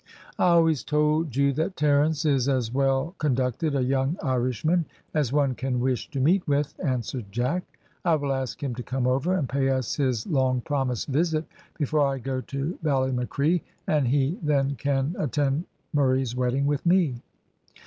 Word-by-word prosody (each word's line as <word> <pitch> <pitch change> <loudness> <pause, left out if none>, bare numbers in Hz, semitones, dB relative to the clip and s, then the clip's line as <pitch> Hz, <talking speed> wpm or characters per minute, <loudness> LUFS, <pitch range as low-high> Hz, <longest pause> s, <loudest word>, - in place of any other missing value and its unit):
"I - - +4
always 165 -4 +4
told 150 -1 +1
you 140 0 +3
that 160 +7 -2
Terence 150 +1 +2
is 140 -3 +2
as 125 -4 0
well 135 +4 +1
conducted 135 +1 0
a 135 - +1
young 135 +5 0
Irishman 130 +6 +1 0.3
as 150 -6 +1
one 140 -2 +2
can 130 0 -2
wish 125 -1 -1
to 140 - -4
meet 175 +8 +2
with," 145 0 +1
answered 125 -3 -2
Jack. 125 - 0 0.4
"I 170 -2 +3
will 140 -2 -1
ask 130 0 -4
him 135 -3 -2
to 125 - -5
come 130 +1 -2
over 135 +9 +1
and 150 -8 0
pay 135 +1 0
us 130 -3 -1
his 130 -6 0
long 130 -5 +1
promised 130 -4 -1
visit 155 +2 +1 0.3
before 150 0 +1
I 135 -1 +2
go 130 0 -3
to 140 +6 -4
Ballymacree, 140 +3 +1 0.2
and 150 -4 +2
he 140 +6 +1
then 140 -3 +1
can 140 +4 -1
attend 145 +3 0 0.3
Murray's 130 -4 +1
wedding 125 +2 0
with 145 -1 0
me." 170 -9 +2
140 Hz, 170 wpm, -26 LUFS, 130-150 Hz, 0.4 s, I